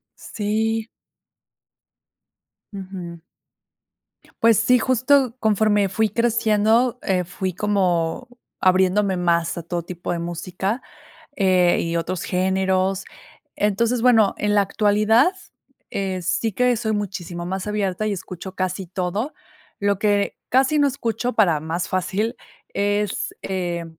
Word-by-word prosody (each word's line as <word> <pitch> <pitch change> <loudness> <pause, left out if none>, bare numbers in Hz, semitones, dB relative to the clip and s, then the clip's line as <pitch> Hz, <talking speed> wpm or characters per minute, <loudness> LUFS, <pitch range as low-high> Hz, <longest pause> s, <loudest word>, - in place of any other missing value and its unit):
Sí. 220 +1 -2 1.8
Ujú. 185 -4 -8 1.2
Pues 230 -2 +6
sí, 250 +3 +4
justo 255 +1 +2
conforme 210 -2 +2
fui 220 +1 +1
creciendo, 230 +1 +2
eh, 185 -2 0
fui 185 +1 -4
como 185 +1 0 0.3
abriéndome 190 +1 +3
más 170 -1 +1
a 170 - -5
todo 170 +1 -3
tipo 175 0 -5
de 170 - -2
música, 180 +7 -3 0.6
eh, 185 -3 +3
y 165 0 -2
otros 175 +2 -2
géneros. 190 +1 0 0.5
Entonces 225 +4 +1
bueno, 225 -5 +4
en 210 0 0
la 205 - +5
actualidad, 215 - +3 0.6
eh, 190 -2 -3
sí 195 +5 0
que 250 +4 +2
soy 220 -1 -2
muchísimo 185 -4 -4
más 190 +2 -3
abierta 210 -1 -1
y - - 0
escucho 190 -1 -7
casi 185 0 -3
todo. 190 - -3 0.5
Lo 200 -1 +1
que 205 -1 +1
casi 270 +4 +3
no 285 - +4
escucho 245 -2 -2
para 175 -10 +2
más 165 +3 -3
fácil 200 +4 -1 0.4
es, 205 0 -1
eh, 175 -3 -3
200 Hz, 120 wpm, -22 LUFS, 185-220 Hz, 1.8 s, Pues